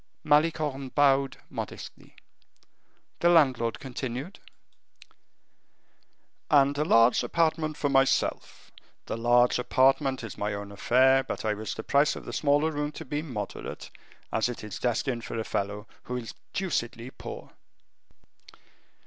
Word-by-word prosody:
Malicorne 150 -3 +1
bowed 140 -1 +2
modestly. - - -8 1.0
The 175 - +4
landlord 130 -9 +3
continued: 130 +6 -6 2.1
"'And 140 -1 +4
a - - +3
large 115 -4 +5
apartment 160 -2 0
for 145 - 0
myself. 135 -1 0 0.3
The - - -4
large 120 +2 +3
apartment 130 +1 +2
is 115 - -8
my 105 0 -1
own 100 0 -7
affair, 130 +6 +4
but 130 - -5
I 110 - +1
wish 105 +1 -5
the - - -6
price 140 +2 +2
of - - -9
the - - -7
smaller 145 +2 +2
room 150 0 -2
to 160 - -8
be 145 +2 -2
moderate, 120 -10 -6 0.4
as 110 +2 +1
it 120 - -6
is 105 -3 -7
destined 120 0 -1
for - - -5
a 110 - -1
fellow 105 0 -3 0.2
who 125 - -3
is 115 -2 -7 0.2
deucedly 130 - -3
poor. - - -9
130 Hz, 130 wpm, -27 LUFS, 115-145 Hz, 2.1 s, large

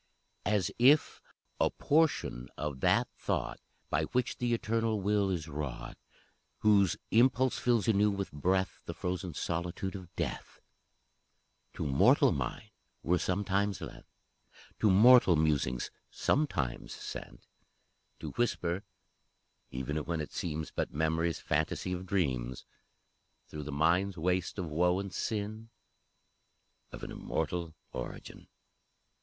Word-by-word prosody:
As 100 -4 +1
if 140 +5 +5 0.4
a - - +4
portion 145 - +1
of 75 -3 -3
that - - +3
Thought - - -2 0.3
By 80 +2 +2
which 125 +8 -1
the 120 -1 -1
Eternal 115 -1 0
will 100 0 +2
is 85 -4 -2
wrought, 70 -5 -5 0.7
Whose 100 -4 +4
impulse 125 +2 +4
fills 120 -4 +2
anew 105 -1 +4
with 100 -1 -3
breath 95 +6 0
The - - -6
frozen 90 -2 -3
solitude 85 +4 -3
of 90 -3 -9
Death, - - -4 1.1
To - - -4
mortal 70 -2 +5
mind 105 - -4 0.3
were 90 +1 +2
sometimes 100 +1 0
lent, - - -9 0.7
To 105 - +4
mortal 110 -1 +7
musings 75 -5 +1 0.2
sometimes 70 - -1
sent, - - -8 0.8
To - - -5
whisper 95 -7 0 0.9
even 65 +4 -3
when 80 +2 -2
it 75 - -4
seems 80 -2 -3
But - - -2
Memory's 80 +2 0
fantasy 80 +4 -1
of 90 +1 -5
dreams 65 -10 -1 0.8
Through 75 -1 -6
the 75 - -5
mind's 85 +6 +2
waste 90 +3 0
of 90 - -2
woe 90 +3 +3
and 100 -1 -5
sin, 110 0 -3 1.2
Of - - -9
an - - -5
immortal 80 0 -3 0.2
origin! 60 - -7
90 Hz, 120 wpm, -31 LUFS, 75-105 Hz, 1.2 s, mortal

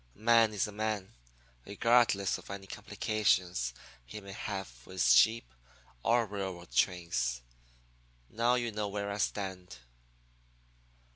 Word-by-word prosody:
A - - -23
man 115 0 +5
is 105 -3 0
a 105 - -7
man, 105 - -3 0.5
regardless 100 - +2
of - - -15
any 100 0 -6
complications 90 - 0 0.3
he - - -9
may 100 -1 -10
have 95 - -6
with 95 +3 -2
sheep 65 - +4 0.5
or 120 - +3
railroad 95 -4 -6
trains. 75 -10 0 0.8
Now 120 - +1
you 120 -2 -1
know 105 -1 -2
where 100 0 -3
I 100 - -4
stand.' 95 -8 -3
100 Hz, 125 wpm, -31 LUFS, 90-110 Hz, 0.8 s, man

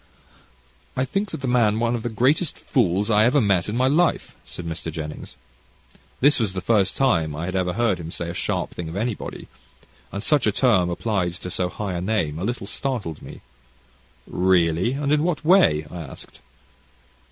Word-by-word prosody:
"I 130 - +2
think 200 +8 -2
that 135 - -5
man 115 -3 +3
one 120 0 +1
of 120 - -2
the 120 - -3
very 110 - -11
greatest 145 - +2
fools 105 -3 +1
I 105 0 +5
ever 125 +6 +4
met 100 -5 +2
in 110 - -2
my 130 - +3
life," 165 +5 +1
said 85 - -8
Mr. 80 0 -4
Jennings. 75 -1 -7 0.8
This 145 +1 +5
was 105 -5 0
the 95 - -2
first 100 +1 +1
time 85 - +2
I 80 +3 -4
had 95 +1 -4
ever 90 -1 0
heard 115 -5 +1
him 80 -1 -6
say 85 0 -4
a 85 - -4
sharp - - -2
thing 85 -2 -6
of 80 - -7
anybody, 110 +2 -4 0.6
and 100 +2 -5
such 145 -5 +2
a - - +4
term 100 -6 +3
applied 90 -1 -1
to 90 0 -7
so 90 0 0
high 100 0 -4
a 85 - -3
name 90 -7 -1
a - - -4
little 120 -1 -3
startled 105 - -3
me. - - -11 0.8
"Really! 90 +3 +2
and 140 +1 -1
in 150 0 +3
what 155 -3 -1
way?" 155 - +5
I 90 - -6
asked. 75 - -11
105 Hz, 195 wpm, -23 LUFS, 90-125 Hz, 0.8 s, I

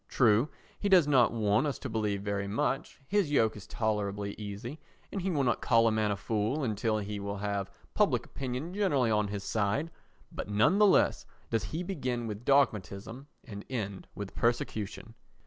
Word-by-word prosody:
True, 115 +3 +3 0.3
he 205 - 0
does 180 -6 +6
not 130 -5 +5
want 110 +4 +2
us 140 - -2
to - - -6
believe 105 -3 -1
very 100 -1 -2
much; 115 +9 -1
his 195 +1 +1
yoke 110 -6 +3
is 105 - -10
tolerably 105 -2 -1
easy, 105 +7 -7 0.3
and 195 - -3
he 190 - -1
will 150 -6 +1
not 120 - +1
call 115 -1 +4
a - - +3
man 110 -1 +1
a 100 - +1
fool 110 +9 -1
until 110 -1 0
he 105 0 -4
will 100 0 -4
have 100 -1 -2 0.2
public - - +2
opinion 135 +6 -5
generally 145 - +2
on 105 -1 +2
his 100 -1 -4
side; 110 +12 0 0.4
but - - -6
none 130 - +3
the 210 - +7
less - - +3 0.2
does 115 -3 0
he 160 - -3
begin 130 -10 -2
with 110 +1 -6
dogmatism 125 -2 +1 0.2
and 100 -2 -8
end 100 -7 -4
with 100 -2 -6
persecution. 115 -2 -2
110 Hz, 180 wpm, -30 LUFS, 105-140 Hz, 0.4 s, the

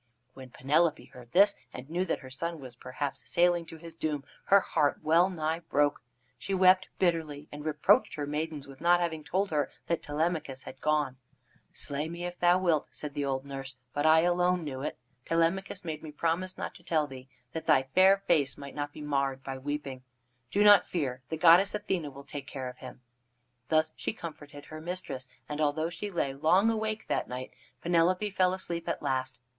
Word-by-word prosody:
When 130 -1 -11
Penelope 150 +6 +1
heard 120 -2 -13
this, 200 +5 +6 0.2
and 125 +1 -9
knew 175 +4 -1
that - - -2
her 130 -2 -11
son 165 +5 -4
was 130 -3 -9
perhaps 130 +3 -5
sailing 175 -1 +3
to 165 - -10
his 165 0 -9
doom, 155 -3 -2 0.2
her 200 0 +7
heart 145 -6 0
well 170 +4 +4
nigh 160 -2 -2
broke. 145 -3 +1 0.4
She 195 - -2
wept 185 0 +5
bitterly, 160 -5 0
and 145 0 -8
reproached 150 -1 +3
her 145 - -3
maidens 150 0 -3
with 135 -1 -13
not 175 +1 +5
having 160 -3 -2
told 190 +5 -1
her 150 -2 +1 0.2
that 170 - -1
Telemachus 150 -3 -2
had 130 - -10
gone. 150 -4 +1 0.5
"Slay 145 +2 -3
me 170 +1 -5
if 175 0 -6
thou 175 +1 +5
wilt," 170 -5 +1
said 150 -1 -7
the 145 -1 -2
old 135 0 -2
nurse, 135 -1 -6 0.2
"but 145 +2 +1
I 160 +1 +7
alone 175 0 +2
knew 135 -4 -5
it. 145 - -4 0.3
Telemachus 175 +3 0
made 155 -2 -4
me 155 - -8
promise 170 +4 -1
not - - -4
to - - -16
tell 155 -3 +1
thee, 130 -2 -11 0.2
that 160 - -5
thy 150 -4 +5
fair 190 +1 +7
face 145 -6 +2
might 140 -1 -9
not 145 0 -3
be - - -9
marred 140 -2 -1
by 135 -1 -5
weeping. 140 -1 -4 0.5
Do 205 +9 +2
not 205 -1 +7
fear, 135 -7 -2
the 160 - -2
goddess 180 +5 +6
Athene 185 -7 -2
will 140 +1 -11
take 140 -1 -7
care 130 -2 -5
of 125 - -12
him." 130 -1 -10 0.7
Thus 155 0 +3
she - - -3
comforted 145 -6 -9
her 155 0 -9
mistress, 160 -7 -5 0.2
and 150 +1 -3
although 155 +2 +1
she 205 +3 -5
lay 170 -7 -1
long 180 +10 +4
awake 220 0 -2
that - - -1
night, 130 +1 -6 0.3
Penelope 180 +4 +2
fell 185 -1 +3
asleep 170 -2 -4
at - - -3
last. 130 -1 -1
155 Hz, 195 wpm, -30 LUFS, 140-175 Hz, 0.7 s, her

